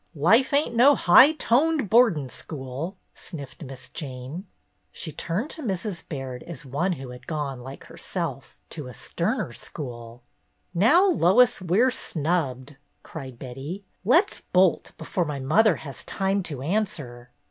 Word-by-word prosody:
"Huh, - - -12
life 225 - +5
ain't 285 -4 +1
no 270 +5 +7
high 260 - +7
toned 300 -1 +2
boardin' 210 - +4
school," 140 +7 -6 0.2
sniffed 140 -5 -8
Miss 135 -4 -8
Jane. 140 +6 -7 0.4
She 160 - -4
turned 185 - -3
to 320 - -7
Mrs. 195 - -3
Baird 135 -4 -5
as 170 -3 -9
one 145 +8 0
who 135 -5 -8
had 125 - -12
gone, 145 -5 -3
like 135 +2 -9
herself, 75 - -5
to 145 -4 -7
a 125 - -10
sterner - - -2
school. 120 -3 -8 0.5
"Now, 275 - +5
Lois, 240 - +4
we're 195 +9 +3
snubbed!" 145 - -2 0.3
cried 130 -3 -8
Betty. 135 +11 -7
" - - -44
Let 380 +6 +5
's - - -10
bolt 185 -1 +2
before 180 - -2
my 150 -2 -4
mother 170 +9 +4
has 140 -3 -8
time 195 +1 0
to 135 -4 -6
answer." 150 - -3
165 Hz, 150 wpm, -25 LUFS, 135-215 Hz, 0.5 s, no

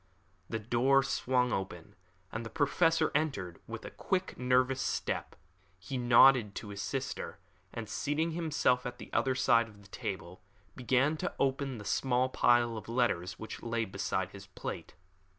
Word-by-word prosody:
The 115 - -1
door 120 +5 +3
swung 125 -2 +1
open, 95 0 -4 0.4
and 110 - -4
the 115 - -6
Professor 160 +3 +2
entered 120 - -1
with - - -7
a - - -7
quick, 185 -1 -2
nervous 130 +1 +2
step. - - -2 0.4
He 95 +8 -7
nodded 120 -3 +6
to 105 - -6
his 100 0 -5
sister, - - -4 0.3
and 115 -2 -6
seating 150 +9 -1
himself 145 -7 +1
at 125 0 -7
the - - -11
other 130 -1 +2
side 115 -2 +4
of 100 -2 -16
the - - -16
table, 95 -5 -6 0.3
began 130 +5 +2
to 180 - -3
open 135 -1 0
the 105 - -9
small 130 +3 +1
pile 120 -2 +3
of 110 0 -8
letters 115 -7 0
which 110 - -7
lay 115 -1 -1
beside 95 -1 -2
his 100 0 -11
plate. 90 - -7
120 Hz, 160 wpm, -32 LUFS, 105-135 Hz, 0.4 s, nodded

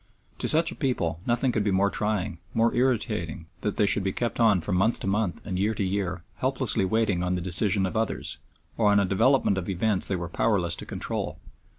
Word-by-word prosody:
To - - -1
such 165 +2 +3
a - - -8
people 90 - -1
nothing 120 +2 +2
could 110 -3 0
be 105 - 0
more 100 +1 +2
trying, 105 -5 -2 0.2
more 115 +1 +3
irritating 110 -10 0 0.2
than 105 - -1
that - - -16
they 105 - +4
should 100 0 +2
be 95 - 0
kept 120 +5 -3
on 110 -5 +5
from 90 +3 -1
month 105 +6 +2
to - - -4
month 100 -2 -1
and 90 -2 -3
year 105 +3 +1
to 100 - -1
year 95 -2 -2
helplessly 130 -6 +1
waiting 105 -3 +1
on 90 0 0
the - - -1
decision 95 +3 +2
of 95 - -4
others, 110 -1 -2 0.4
or 110 -2 +3
on 100 - +5
a 100 - +2
development 100 +1 +3
of 90 - -6
events 95 +1 0
they 95 - -1
were 85 -1 -4
powerless 90 -2 0
to - - -8
control. - - -4
100 Hz, 225 wpm, -26 LUFS, 95-115 Hz, 0.4 s, on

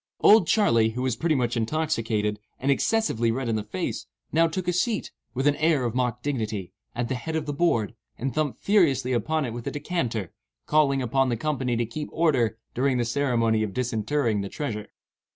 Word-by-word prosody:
"Old 210 -5 +7
Charley," 115 - +4
who 125 +2 -3
was 130 -3 0
pretty 160 +5 +1
much 120 -2 0
intoxicated, 115 -5 -1 0.2
and 140 +2 +1
excessively 140 - +1
red 125 +2 -1
in 115 - 0
the 110 - 0
face, 105 -3 -4 0.2
now 165 +2 +4
took 175 +2 -4
a 180 - +2
seat, 210 +5 0 0.2
with 135 +2 -1
an 145 0 +4
air 155 -5 +2
of 115 - -1
mock 125 -1 -1
dignity, 110 -9 -3 0.2
at 120 0 -1
the 130 - -2
head 145 +6 -4
of 160 -1 -1
the 145 - -3
board, 130 - +1 0.2
and 130 +1 -3
thumped 155 -1 -1
furiously 140 - +3
upon 155 +6 0
it 120 - -4
with 120 0 -6
a - - -1
decanter, 135 - -3 0.3
calling 140 -3 +3
upon 130 +2 +2
the 120 - 0
company 130 -2 -1
to 120 0 0
keep 135 +7 -6
order 130 -9 +2 0.2
"during 130 +1 +1
the 120 - +1
ceremony 115 -3 +1
of 105 -3 -3
disinterring 115 -1 0
the 100 - -5
treasure." 105 -7 -4
125 Hz, 200 wpm, -26 LUFS, 115-150 Hz, 0.3 s, Old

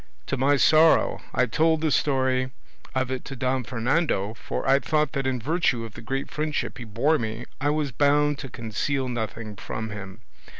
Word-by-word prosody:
To - - -1
my 140 +2 +3
sorrow 155 +3 +5
I 125 - +2
told 160 +6 +2
the 160 -2 +1
story 130 -2 +1 0.5
of 130 0 0
it 130 - -3
to 135 - -6
Don 130 0 0
Fernando, 115 - 0
for 115 - -4
I 135 +1 +5
thought 150 -1 +1
that 135 -3 -2
in 130 -1 0
virtue 135 -4 0
of 110 - -10
the - - -10
great 135 +4 -3
friendship 150 -4 -2
he 120 - -6
bore 130 +9 +2
me 110 +1 -4 0.2
I 145 - +2
was 150 -2 0
bound 145 +3 +3
to 135 - -6
conceal 125 +4 -2
nothing 110 -3 -4
from 110 +2 -5
him. 95 +1 -8
130 Hz, 185 wpm, -25 LUFS, 115-145 Hz, 0.5 s, sorrow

